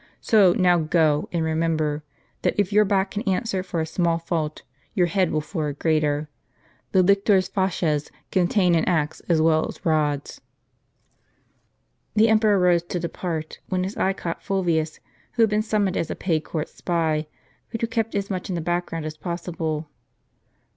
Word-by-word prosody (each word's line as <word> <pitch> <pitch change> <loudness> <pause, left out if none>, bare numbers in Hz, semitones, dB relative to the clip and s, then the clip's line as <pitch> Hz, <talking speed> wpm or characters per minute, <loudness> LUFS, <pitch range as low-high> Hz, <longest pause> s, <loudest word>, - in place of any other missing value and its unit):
So 200 -5 +5
now 180 -1 +4
go; 155 -2 +2
and 165 -2 0
remember, 160 -2 0 0.4
that - - +1
if 205 -1 +1
your 210 +1 +5
back 195 -1 +1
can 210 - -3
answer 190 0 0
for 180 -2 -4
a 160 - 0
small 170 +1 0
fault, 165 -2 -3 0.3
your 180 - +4
head 180 +1 +1
will 155 - 0
for 155 0 -3
a 145 - -4
greater. 150 -1 +1 0.6
The 190 -1 +4
lictors' 200 0 +3
fasces 165 -6 0 0.2
contain 180 0 +3
an 165 -1 +3
axe 160 -4 0
as 160 -2 +3
well 160 -1 +3
as - - -10
rods." 150 -3 0 1.7
The 220 +1 +5
emperor 215 -2 +4
rose 180 -2 +4
to 175 +1 -4
depart, 165 -1 -4
when 185 -1 0
his 195 +3 -4
eye 190 - +1
caught 170 -3 -5
Fulvius, 170 -5 0 0.3
who 235 - +3
had 220 - +3
been 210 0 +2
summoned 210 -3 0
as 165 - -1
a - - -3
paid 165 -4 0
court 155 -1 -3
spy, 160 -3 -1 0.4
but 225 - -4
who - - +2
kept 225 -1 -2
as 200 0 -2
much 185 0 -3
in 185 - -1
the - - -1
back 175 +2 -1
ground 165 -2 -5
as 155 0 -5
possible. 165 -3 -3
175 Hz, 175 wpm, -24 LUFS, 160-195 Hz, 1.7 s, So